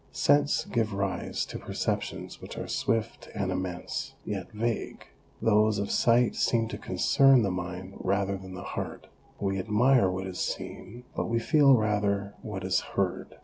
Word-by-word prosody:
Scents 145 Hz, 0 st, +3 dB
give 110 Hz, -3 st, -1 dB
rise 100 Hz, -1 st, -2 dB
to -, -, -7 dB
perceptions -, -, -3 dB
which -, -, -9 dB
are -, -, -4 dB
swift 115 Hz, 0 st, -1 dB
and 95 Hz, -1 st, -1 dB
immense, 90 Hz, -1 st, -4 dB
yet 95 Hz, -4 st, -4 dB
vague; 115 Hz, +1 st, -3 dB, 0.3 s
those 110 Hz, -1 st, +3 dB
of 100 Hz, 0 st, -2 dB
sight 120 Hz, 0 st, +4 dB
seem 115 Hz, -2 st, +1 dB
to -, -, -5 dB
concern 135 Hz, -3 st, +4 dB
the 100 Hz, -, 0 dB
mind 90 Hz, +1 st, -5 dB
rather 100 Hz, +1 st, 0 dB
than 95 Hz, -1 st, -8 dB
the 90 Hz, -, -7 dB
heart; -, -, -5 dB, 0.3 s
we 95 Hz, -1 st, -1 dB
admire 110 Hz, +2 st, +4 dB
what 95 Hz, +1 st, -3 dB
is 95 Hz, -1 st, -6 dB
seen, 120 Hz, +6 st, -5 dB
but -, -, -1 dB
we 115 Hz, -, +1 dB
feel 140 Hz, +2 st, +5 dB
rather 100 Hz, -2 st, 0 dB
what 100 Hz, -4 st, -5 dB
is 95 Hz, -1 st, +2 dB
heard. -, -, -3 dB
105 Hz, 160 wpm, -28 LUFS, 95-115 Hz, 0.3 s, feel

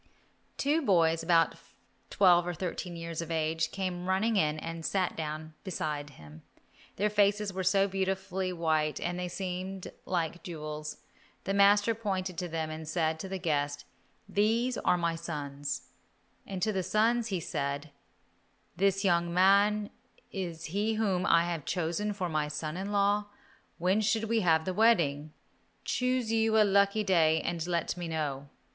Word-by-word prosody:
Two 295 Hz, +4 st, +2 dB
boys 165 Hz, -, +3 dB
about 165 Hz, 0 st, +3 dB, 0.6 s
twelve 175 Hz, -3 st, +4 dB
or 175 Hz, -, -2 dB
thirteen 175 Hz, 0 st, -4 dB
years 165 Hz, -1 st, -5 dB
of 165 Hz, -, -6 dB
age 160 Hz, 0 st, 0 dB
came 180 Hz, -1 st, -4 dB
running 215 Hz, +4 st, +2 dB
in 155 Hz, -5 st, +2 dB
and 165 Hz, +1 st, -6 dB
sat 185 Hz, +2 st, 0 dB
down 155 Hz, 0 st, -5 dB
beside 150 Hz, -6 st, -3 dB
him. 75 Hz, +1 st, -13 dB, 0.5 s
Their 205 Hz, -, +1 dB
faces 205 Hz, -1 st, +2 dB
were 190 Hz, 0 st, -2 dB
so 195 Hz, +2 st, +3 dB
beautifully 190 Hz, -1 st, -2 dB
white 160 Hz, -3 st, 0 dB
they 180 Hz, +1 st, -3 dB
seemed 185 Hz, +1 st, -5 dB, 0.2 s
like 175 Hz, -1 st, -1 dB
jewels. 155 Hz, -3 st, -6 dB, 0.5 s
The 195 Hz, -, -1 dB
master 205 Hz, +2 st, +5 dB
pointed 195 Hz, -4 st, -3 dB
to 180 Hz, -, -3 dB
them 160 Hz, -1 st, -3 dB
and 155 Hz, 0 st, -7 dB
said 160 Hz, 0 st, 0 dB
to 190 Hz, -, -6 dB
the 190 Hz, -, -3 dB
guest, 145 Hz, -4 st, -1 dB, 0.4 s
"These 230 Hz, +5 st, +1 dB
are 180 Hz, -, +2 dB
my 170 Hz, -1 st, 0 dB
sons," 145 Hz, -4 st, -5 dB, 0.6 s
and 190 Hz, -2 st, -4 dB
to 215 Hz, -, +1 dB
the 190 Hz, -, 0 dB
sons 225 Hz, +5 st, +2 dB
he 190 Hz, -5 st, -1 dB
said, 140 Hz, -1 st, -3 dB, 0.8 s
"This 195 Hz, +2 st, +1 dB
young 170 Hz, -2 st, +2 dB
man 200 Hz, +3 st, +4 dB, 0.4 s
is 175 Hz, -4 st, -5 dB
he 215 Hz, +2 st, +1 dB
whom 195 Hz, -5 st, 0 dB
I 170 Hz, 0 st, +5 dB
have 170 Hz, -3 st, -3 dB
chosen 175 Hz, +6 st, -1 dB
for 185 Hz, -3 st, -2 dB
my 155 Hz, -2 st, -1 dB
son 155 Hz, +1 st, -4 dB
in 195 Hz, +3 st, -4 dB
law; 205 Hz, +1 st, +2 dB, 0.5 s
when 185 Hz, +5 st, +2 dB
should 220 Hz, +1 st, +1 dB
we 225 Hz, +1 st, +1 dB
have 160 Hz, -5 st, +3 dB
the 185 Hz, -, -1 dB
wedding? 165 Hz, -9 st, +3 dB, 0.5 s
Choose 250 Hz, -2 st, 0 dB
you 225 Hz, -1 st, +3 dB
a -, -, +7 dB
lucky 200 Hz, +1 st, +3 dB
day 165 Hz, -5 st, +3 dB
and 170 Hz, -1 st, -3 dB
let 170 Hz, -2 st, -1 dB
me 175 Hz, -1 st, -5 dB
know." 145 Hz, -4 st, -3 dB
180 Hz, 160 wpm, -30 LUFS, 160-200 Hz, 0.8 s, a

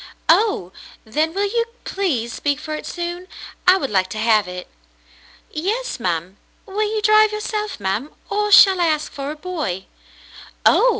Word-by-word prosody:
" -, -, -34 dB
Oh! 350 Hz, -, +3 dB, 0.3 s
Then 305 Hz, +9 st, 0 dB
will 395 Hz, +4 st, 0 dB
you 465 Hz, +3 st, +1 dB, 0.2 s
please 265 Hz, -, -1 dB
speak 285 Hz, -1 st, -1 dB
for 310 Hz, 0 st, -6 dB
it 305 Hz, -, -5 dB
soon? 350 Hz, +1 st, -5 dB, 0.4 s
I 370 Hz, +1 st, +8 dB
would 275 Hz, -, -3 dB
like 185 Hz, -2 st, +1 dB
to -, -, -6 dB
have 215 Hz, -3 st, +3 dB
it." 180 Hz, 0 st, -7 dB, 0.8 s
"Yes, 420 Hz, -, -2 dB
ma'm. 180 Hz, -1 st, -2 dB, 0.3 s
Will 420 Hz, +1 st, -1 dB
you 425 Hz, -, -1 dB
drive 430 Hz, +1 st, +5 dB
yourself, 425 Hz, -, -3 dB
ma'm, 205 Hz, +9 st, -2 dB, 0.2 s
or 420 Hz, 0 st, -1 dB
shall 385 Hz, -2 st, +8 dB
I 340 Hz, -, +3 dB
ask 305 Hz, -1 st, -1 dB
for 275 Hz, 0 st, -5 dB
a 300 Hz, -, -4 dB
boy? 300 Hz, -, -4 dB, 0.4 s
" -, -, -19 dB
Oh! -, -, +6 dB
325 Hz, 175 wpm, -20 LUFS, -, 0.8 s, I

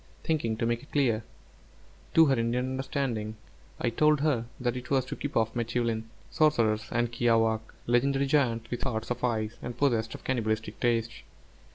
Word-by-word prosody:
Thinking 130 Hz, -9 st, 0 dB
to 115 Hz, -, 0 dB
make 120 Hz, 0 st, 0 dB
it 140 Hz, -, -17 dB
clear 120 Hz, -6 st, +2 dB, 0.9 s
to 165 Hz, -, +8 dB
her 140 Hz, -, +3 dB
Indian 120 Hz, +1 st, 0 dB
understanding, 130 Hz, -5 st, -2 dB, 0.4 s
I 120 Hz, -, 0 dB
told 150 Hz, +4 st, +3 dB
her 140 Hz, -7 st, +1 dB
that 125 Hz, -1 st, -1 dB
it 125 Hz, 0 st, -6 dB
was 135 Hz, -2 st, +2 dB
to -, -, -5 dB
keep 145 Hz, -, -3 dB
off 110 Hz, -1 st, +1 dB
m'tēūlin, 115 Hz, -1 st, -1 dB, 0.3 s
sorcerers, 115 Hz, -8 st, +2 dB
and 120 Hz, 0 st, 0 dB
kiawākq' 115 Hz, -2 st, +2 dB, 0.2 s
(legendary 135 Hz, +3 st, +2 dB
giants 120 Hz, -5 st, +1 dB
with 120 Hz, 0 st, -3 dB
hearts 115 Hz, -3 st, -2 dB
of 120 Hz, 0 st, -3 dB
ice, 110 Hz, -3 st, -1 dB
and 120 Hz, -, -6 dB
possessed 115 Hz, -5 st, +1 dB
of -, -, -11 dB
cannibalistic 110 Hz, -4 st, -1 dB
tastes). 115 Hz, -1 st, 0 dB
120 Hz, 170 wpm, -29 LUFS, 115-135 Hz, 0.9 s, to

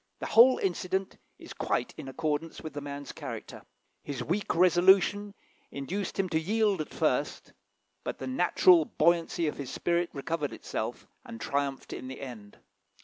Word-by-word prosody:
The -, -, -5 dB
whole 245 Hz, +3 st, +7 dB
incident 190 Hz, 0 st, -2 dB, 0.2 s
is -, -, -10 dB
quite -, -, -1 dB
in -, -, -8 dB
accordance 150 Hz, +4 st, -2 dB
with 155 Hz, -, -7 dB
the 145 Hz, -, -5 dB
man's 140 Hz, -1 st, -6 dB
character. -, -, -7 dB, 0.4 s
His 135 Hz, -4 st, -5 dB
weak 180 Hz, +8 st, -1 dB
resolution 190 Hz, +3 st, +4 dB, 0.3 s
induced 180 Hz, +8 st, -4 dB
him 195 Hz, -, +3 dB
at 180 Hz, -, -8 dB
first 160 Hz, -, +2 dB
to 200 Hz, -2 st, 0 dB
yield, -, -, -31 dB, 0.5 s
but -, -, -4 dB
the 130 Hz, -, -6 dB
natural 170 Hz, +4 st, +4 dB
buoyancy 170 Hz, +1 st, +1 dB
of 150 Hz, -, -2 dB
his 140 Hz, -3 st, -5 dB
spirit 175 Hz, 0 st, 0 dB
recovered 150 Hz, 0 st, -3 dB
itself, -, -, -5 dB, 0.2 s
and 115 Hz, -, -9 dB
triumphed 140 Hz, +2 st, -2 dB
in 130 Hz, -, -7 dB
the 130 Hz, -, -7 dB
end. 115 Hz, -7 st, -9 dB
165 Hz, 155 wpm, -29 LUFS, 140-185 Hz, 0.5 s, whole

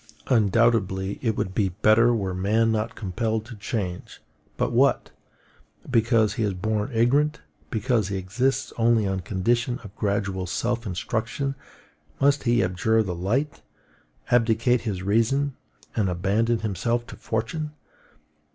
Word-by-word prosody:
Undoubtedly 105 Hz, -4 st, +2 dB
it 115 Hz, -5 st, 0 dB
would 95 Hz, -, -2 dB
be 95 Hz, -1 st, +1 dB
better 110 Hz, +5 st, +4 dB
were 100 Hz, -5 st, -1 dB
man 110 Hz, +5 st, +2 dB
not 110 Hz, +1 st, -1 dB
compelled 110 Hz, +2 st, -2 dB
to 120 Hz, +1 st, -9 dB
change: 100 Hz, -3 st, -4 dB, 0.4 s
but -, -, 0 dB
what! -, -, +2 dB, 0.8 s
because 115 Hz, -2 st, +3 dB
he 115 Hz, -, -1 dB
is 100 Hz, -3 st, -1 dB
born 105 Hz, +2 st, -1 dB
ignorant, 140 Hz, +7 st, +2 dB, 0.3 s
because 115 Hz, -3 st, 0 dB
he 100 Hz, -1 st, -3 dB
exists 115 Hz, +9 st, -1 dB
only 115 Hz, -2 st, +3 dB
on 95 Hz, -1 st, -1 dB
condition 115 Hz, +7 st, 0 dB
of 100 Hz, -2 st, -11 dB
gradual 100 Hz, -3 st, -1 dB
self 115 Hz, +5 st, -2 dB
instruction, 110 Hz, +8 st, -2 dB, 0.7 s
must 140 Hz, 0 st, +3 dB
he 120 Hz, -3 st, +3 dB
abjure 110 Hz, +5 st, +1 dB
the 95 Hz, -4 st, -3 dB
light, 115 Hz, -, -1 dB, 0.7 s
abdicate 120 Hz, +1 st, +3 dB
his 100 Hz, -5 st, -3 dB
reason, 120 Hz, +7 st, +1 dB, 0.4 s
and 105 Hz, -4 st, +1 dB
abandon 105 Hz, +6 st, +1 dB
himself 115 Hz, +4 st, -1 dB
to -, -, -10 dB
fortune? 120 Hz, +8 st, -3 dB
110 Hz, 135 wpm, -25 LUFS, 100-120 Hz, 0.8 s, better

